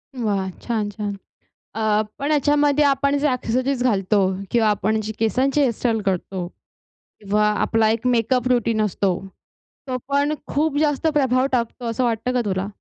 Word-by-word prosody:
वाह! 200 Hz, -6 st, -1 dB
छान, 220 Hz, -3 st, -1 dB
छान. 205 Hz, -1 st, -4 dB, 0.6 s
अ, 215 Hz, -1 st, +1 dB, 0.2 s
पण 285 Hz, +2 st, -2 dB
याच्यामध्ये 290 Hz, 0 st, +3 dB
आपण 280 Hz, 0 st, +2 dB
जे 295 Hz, -, +1 dB
ॲक्सेसरीज 255 Hz, +1 st, -1 dB
घालतो 200 Hz, -3 st, +2 dB, 0.3 s
किंवा 225 Hz, -2 st, +3 dB
आपण 215 Hz, +1 st, +1 dB
जे 215 Hz, 0 st, -4 dB
केसांची 260 Hz, +6 st, +1 dB
हेयरस्टाईल 235 Hz, -3 st, +1 dB
करतो 185 Hz, -1 st, -2 dB, 0.7 s
किंवा 210 Hz, +1 st, +1 dB
आपला 220 Hz, +1 st, +2 dB
एक 230 Hz, +3 st, 0 dB
मेकअप 250 Hz, +1 st, +1 dB
रूटीन 230 Hz, -3 st, +1 dB
असतो. 195 Hz, -2 st, 0 dB, 0.7 s
तो 255 Hz, -1 st, -2 dB
पण 285 Hz, +2 st, +1 dB
खूप 295 Hz, 0 st, 0 dB
जास्त 300 Hz, 0 st, +1 dB
प्रभाव 265 Hz, -4 st, +2 dB
टाकतो, 240 Hz, 0 st, -2 dB
असं 230 Hz, +3 st, -1 dB
वाटतं 240 Hz, +1 st, -1 dB
का 250 Hz, -, +2 dB
तुला? 190 Hz, 0 st, -1 dB
235 Hz, 150 wpm, -22 LUFS, 210-270 Hz, 0.7 s, याच्यामध्ये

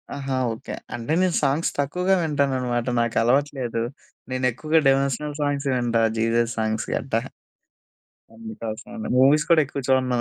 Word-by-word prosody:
ఆహా! 135 Hz, -1 st, -3 dB, 0.2 s
ఓకే. 115 Hz, +5 st, -7 dB, 0.2 s
అంటే 120 Hz, +5 st, -3 dB
నేను 185 Hz, -2 st, +2 dB
సాంగ్స్ 145 Hz, +5 st, +1 dB
తక్కువగా 180 Hz, +7 st, +1 dB
వింటాననమాట. 130 Hz, -5 st, 0 dB
నాకు 115 Hz, -1 st, -1 dB
అలవాటు 135 Hz, +5 st, +2 dB
లేదు. 115 Hz, -2 st, -2 dB, 0.5 s
నేను 130 Hz, 0 st, -1 dB
ఎక్కువగా 155 Hz, +7 st, +1 dB
డివోషనల్ 140 Hz, +2 st, +1 dB
సాంగ్స్ 145 Hz, -1 st, -1 dB
వింటా 120 Hz, -2 st, +1 dB, 0.2 s
జీసస్ 115 Hz, +1 st, +1 dB
సాంగ్స్ 110 Hz, 0 st, -1 dB
గట్టా... 120 Hz, -4 st, -1 dB, 1.2 s
అందుకోసం 110 Hz, 0 st, -7 dB
అని. 225 Hz, -, -5 dB
మూవీస్ 145 Hz, +3 st, +5 dB
కూడా 165 Hz, -2 st, +6 dB
ఎక్కువ 140 Hz, 0 st, -5 dB
చూడను. 130 Hz, -2 st, +2 dB
130 Hz, 140 wpm, -23 LUFS, 115-145 Hz, 1.2 s, కూడా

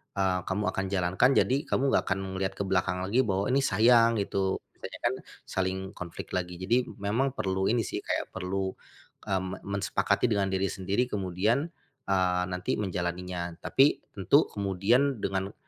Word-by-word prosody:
eee, 95 Hz, -2 st, +1 dB
kamu 100 Hz, +2 st, -1 dB
akan 95 Hz, -, -2 dB
jalankan 95 Hz, +4 st, +2 dB
jadi 130 Hz, -, +3 dB
kamu -, -, +1 dB
enggak -, -, +3 dB
akan 95 Hz, -, 0 dB
ngelihat 95 Hz, 0 st, -2 dB
ke 100 Hz, -, -2 dB
belakang 90 Hz, -1 st, 0 dB
lagi 100 Hz, +7 st, +1 dB
bahwa 100 Hz, -2 st, +1 dB
ini 135 Hz, -, +4 dB
sayang, 115 Hz, -2 st, +5 dB
gitu 100 Hz, -1 st, 0 dB, 0.2 s
banyak -, -, -8 dB
kan -, -, +2 dB, 0.3 s
saling 95 Hz, 0 st, -2 dB
konflik 85 Hz, -2 st, -8 dB
lagi. 90 Hz, -1 st, -2 dB
Jadi 115 Hz, +8 st, +1 dB, 0.2 s
memang 130 Hz, +7 st, 0 dB
perlu 95 Hz, 0 st, 0 dB
ini 115 Hz, 0 st, +2 dB
sih -, -, -3 dB
kayak -, -, -3 dB
perlu, 95 Hz, +1 st, -2 dB, 0.6 s
eee, 95 Hz, -2 st, +1 dB
me 95 Hz, 0 st, -5 dB, 0.2 s
mensepakati 105 Hz, +4 st, +1 dB
dengan 100 Hz, -2 st, +2 dB
diri 95 Hz, -1 st, 0 dB
sendiri 95 Hz, +6 st, 0 dB
kemudian, 105 Hz, -, 0 dB, 0.4 s
eee, 90 Hz, -2 st, +2 dB
nanti 90 Hz, +2 st, -2 dB
menjalaninya. 90 Hz, -2 st, -3 dB
Tapi 135 Hz, +2 st, +3 dB
tentu 105 Hz, -, +3 dB
kemudian 105 Hz, +6 st, +1 dB
dengan, 95 Hz, +1 st, -2 dB
95 Hz, 160 wpm, -28 LUFS, 95-105 Hz, 0.6 s, sayang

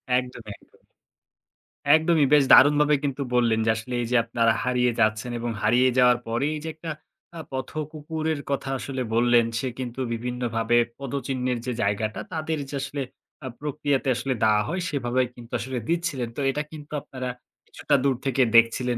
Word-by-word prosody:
একদমই, 125 Hz, -3 st, -3 dB
একদমই। -, -, -27 dB, 1.1 s
একদমই, 160 Hz, -1 st, +3 dB
বেশ 145 Hz, -1 st, +7 dB
দারুণভাবে 150 Hz, +1 st, +6 dB
কিন্তু 140 Hz, -1 st, -2 dB
বললেন 115 Hz, -2 st, +3 dB
যে -, -, +2 dB
আসলে 115 Hz, +3 st, -6 dB
এই 120 Hz, -, -3 dB
যে -, -, +2 dB
আপনারা 115 Hz, -1 st, +2 dB
হারিয়ে 125 Hz, -1 st, +2 dB
যাচ্ছেন 110 Hz, +2 st, +1 dB
এবং 120 Hz, 0 st, -3 dB
হারিয়ে 120 Hz, +4 st, +4 dB
যাওয়ার 125 Hz, -1 st, +5 dB
পরে 115 Hz, +4 st, -1 dB
এই -, -, -4 dB
যে 160 Hz, -, -4 dB
একটা 160 Hz, +1 st, -8 dB, 0.5 s
আ -, -, -6 dB
পথ 130 Hz, -2 st, -4 dB, 0.2 s
কুকুরের 155 Hz, 0 st, -3 dB
কথা 140 Hz, -1 st, -2 dB
আসলে 130 Hz, +1 st, -4 dB
বললেন। 120 Hz, 0 st, +4 dB
সে 130 Hz, -, -2 dB
কিন্তু 125 Hz, 0 st, -5 dB
বিভিন্নভাবে 120 Hz, -1 st, -1 dB, 0.2 s
পদচিহ্নের 130 Hz, -2 st, -2 dB
যে 125 Hz, -, -2 dB
জায়গাটা 105 Hz, +1 st, -1 dB
তাদের 160 Hz, -1 st, -2 dB
যে 145 Hz, -, -5 dB
আসলে 140 Hz, +1 st, -4 dB, 0.4 s
আ -, -, -3 dB
প্রক্রিয়াতে 145 Hz, -2 st, -1 dB
আসলে 135 Hz, +2 st, -1 dB
দেওয়া 105 Hz, -1 st, +4 dB
হয় 180 Hz, +6 st, -2 dB
সেভাবেই 130 Hz, -2 st, 0 dB
কিন্তু 120 Hz, -1 st, -13 dB
আসলে 130 Hz, +4 st, -4 dB
দিচ্ছিলেন। 165 Hz, -8 st, -1 dB
তো -, -, -2 dB
এটা 150 Hz, +2 st, -2 dB
কিন্তু 150 Hz, -1 st, -10 dB
আপনারা 130 Hz, -2 st, -6 dB, 0.4 s
কিছুটা 145 Hz, -, 0 dB
দূর 135 Hz, -2 st, +2 dB
থেকে 135 Hz, 0 st, +1 dB
দেখছিলেন 120 Hz, +1 st, +4 dB
125 Hz, 170 wpm, -25 LUFS, 120-145 Hz, 1.1 s, বেশ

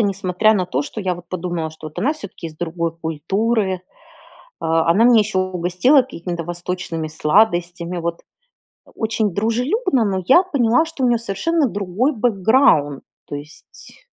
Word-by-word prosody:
несмотря 200 Hz, +1 st, +2 dB
на 185 Hz, -3 st, 0 dB
то, 135 Hz, -3 st, -1 dB
что 215 Hz, -, -7 dB
я 185 Hz, -3 st, -1 dB
вот 175 Hz, 0 st, -12 dB
подумала, 175 Hz, -3 st, -3 dB
что 155 Hz, 0 st, -9 dB
вот 150 Hz, -, -12 dB
она 295 Hz, -, +1 dB
всё-таки 200 Hz, -, -8 dB
из 155 Hz, -, -15 dB
другой 170 Hz, 0 st, -3 dB
культуры. 190 Hz, +6 st, -1 dB, 0.9 s
Э, -, -, -3 dB
она 165 Hz, +6 st, +3 dB
меня 240 Hz, -2 st, +6 dB
еще 205 Hz, -2 st, -1 dB
угостила 185 Hz, -, +3 dB
какими-то 175 Hz, -9 st, -6 dB
восточными 175 Hz, -1 st, -4 dB
сладостями, 175 Hz, +1 st, +1 dB
вот, 170 Hz, 0 st, -4 dB, 0.7 s
очень 220 Hz, -2 st, -1 dB
дружелюбно, 250 Hz, -, 0 dB
но 190 Hz, -2 st, -1 dB
я 345 Hz, +8 st, +6 dB
поняла, 270 Hz, -4 st, +2 dB
что 320 Hz, -5 st, -5 dB
у -, -, +4 dB
нее 240 Hz, -1 st, +3 dB
совершенно 275 Hz, -, 0 dB
другой 205 Hz, +7 st, -1 dB
бэкграунд, 205 Hz, -, +2 dB, 0.2 s
то 145 Hz, -, -6 dB
есть 150 Hz, -, -13 dB
185 Hz, 150 wpm, -20 LUFS, 170-230 Hz, 0.9 s, меня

